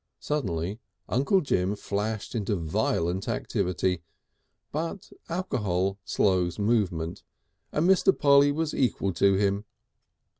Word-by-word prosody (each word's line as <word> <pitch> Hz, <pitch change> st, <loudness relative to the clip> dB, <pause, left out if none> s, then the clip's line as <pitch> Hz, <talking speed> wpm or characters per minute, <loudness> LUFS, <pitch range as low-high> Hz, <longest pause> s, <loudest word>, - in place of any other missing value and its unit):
Suddenly 100 Hz, -, -2 dB, 0.3 s
Uncle 140 Hz, +9 st, +2 dB
Jim 100 Hz, -, 0 dB
flashed 105 Hz, +1 st, -3 dB
into 105 Hz, -3 st, -1 dB
violent 85 Hz, +2 st, -1 dB
activity, 90 Hz, -1 st, -1 dB, 0.7 s
but 165 Hz, +5 st, -4 dB, 0.2 s
alcohol 100 Hz, -, -1 dB
slows 90 Hz, -3 st, +1 dB
movement, 100 Hz, -7 st, 0 dB, 0.5 s
and 155 Hz, +3 st, +1 dB
Mr. 190 Hz, 0 st, +5 dB
Polly 140 Hz, 0 st, +5 dB
was 155 Hz, +1 st, -1 dB
equal 100 Hz, -7 st, 0 dB
to 100 Hz, +3 st, +4 dB
him. 100 Hz, +1 st, +1 dB
100 Hz, 105 wpm, -27 LUFS, 90-140 Hz, 0.7 s, Mr